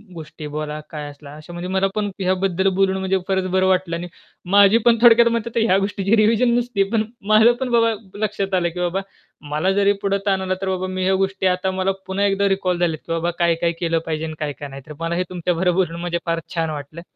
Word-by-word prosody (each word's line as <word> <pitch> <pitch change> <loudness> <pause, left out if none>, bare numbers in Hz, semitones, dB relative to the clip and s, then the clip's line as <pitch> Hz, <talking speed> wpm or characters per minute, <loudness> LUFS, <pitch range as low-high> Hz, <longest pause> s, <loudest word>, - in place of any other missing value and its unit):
गोष्टी 155 -1 -8
बोला, 150 0 -4
काय 150 -2 -6
असला 145 0 -13
अशा 155 +3 -11
म्हणजे 175 +1 -5
मला 190 +1 +1
पण 210 -1 -1
ह्याबद्दल 190 0 0
बोलून 190 0 +2
म्हणजे 190 0 0
फारच 190 -1 0
बरं 190 0 +2
वाटलं 185 -2 +1
आणि 175 +1 -5 0.4
माझी 200 +2 +6
पण 230 -1 +5
थोडक्यात 235 0 +7
मतं 235 0 -1
तर - - +3
ह्या 195 -4 +3
गोष्टीची 200 +1 0
रिव्हिजन 225 +3 +3
नसती 235 -5 0
पण 220 -2 +2 0.2
माझं 220 +3 +6
पण 255 - -1
बाबा 230 -1 +3 0.3
लक्षात 200 -2 -2
आलं, 175 -1 +1
की 180 +2 -8
बाबा 180 +2 -1 0.5
मला 155 +6 +1
जरी 200 0 +3
पुढे 200 0 +1
ताण 190 -1 +2
आला 185 0 -1
तर 195 - -2
बाबा 185 0 -2
मी 185 0 -3
ह्या 190 0 +3
गोष्टी 190 0 -1
आता 185 +1 0
मला 190 +1 0 0.2
पुन्हा 195 +2 0
एकदा 200 0 +2
रिकॉल 185 -2 0
झाल्यात, 165 -3 0
की - - -5
बाबा 170 +1 -1
काय-काय 170 0 +2
केलं 165 -1 0
पाहिजे, 160 0 -3
काय-काय 145 -1 -5
नाही. 135 0 -9
तर 150 - -8
मला 165 +1 -2
हे 180 - 0
तुमच्या 180 0 -1
बरोबरून 175 -1 0
म्हणजे 175 -1 -1
फार 165 -1 0 0.2
छान 165 -1 0
वाटलं. 150 +2 -7
185 Hz, 225 wpm, -21 LUFS, 170-195 Hz, 0.5 s, थोडक्यात